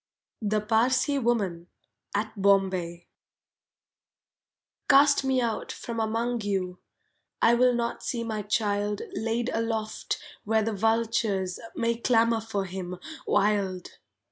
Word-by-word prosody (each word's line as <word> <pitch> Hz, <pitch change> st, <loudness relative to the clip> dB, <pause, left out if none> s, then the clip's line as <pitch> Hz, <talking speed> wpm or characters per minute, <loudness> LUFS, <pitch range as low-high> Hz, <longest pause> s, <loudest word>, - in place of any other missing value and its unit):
THE 210 Hz, 0 st, +1 dB
PARSEE 245 Hz, +6 st, +2 dB
WOMAN 200 Hz, -9 st, 0 dB, 0.5 s
(At 215 Hz, +1 st, -1 dB
Bombay) 185 Hz, -3 st, +2 dB, 1.8 s
Cast 280 Hz, 0 st, +6 dB
me 265 Hz, -1 st, +2 dB
out 230 Hz, -3 st, -2 dB
from 230 Hz, -1 st, -5 dB
among 230 Hz, +2 st, -1 dB
you, 190 Hz, -3 st, -2 dB, 0.6 s
I 230 Hz, -, +5 dB
will 250 Hz, +1 st, +4 dB
not 235 Hz, 0 st, -2 dB
see 235 Hz, -2 st, -2 dB
my 220 Hz, -2 st, -3 dB
child 205 Hz, -1 st, 0 dB
Laid 230 Hz, +2 st, -1 dB
aloft 225 Hz, -1 st, -2 dB, 0.3 s
where 220 Hz, +1 st, +2 dB
the 225 Hz, +1 st, -1 dB
vultures 220 Hz, -3 st, 0 dB, 0.2 s
May 230 Hz, 0 st, 0 dB
clamour 230 Hz, -1 st, +3 dB
for 205 Hz, -3 st, -3 dB
him, 180 Hz, -1 st, -6 dB, 0.3 s
wild! 195 Hz, -3 st, 0 dB
220 Hz, 115 wpm, -27 LUFS, 200-235 Hz, 1.8 s, Cast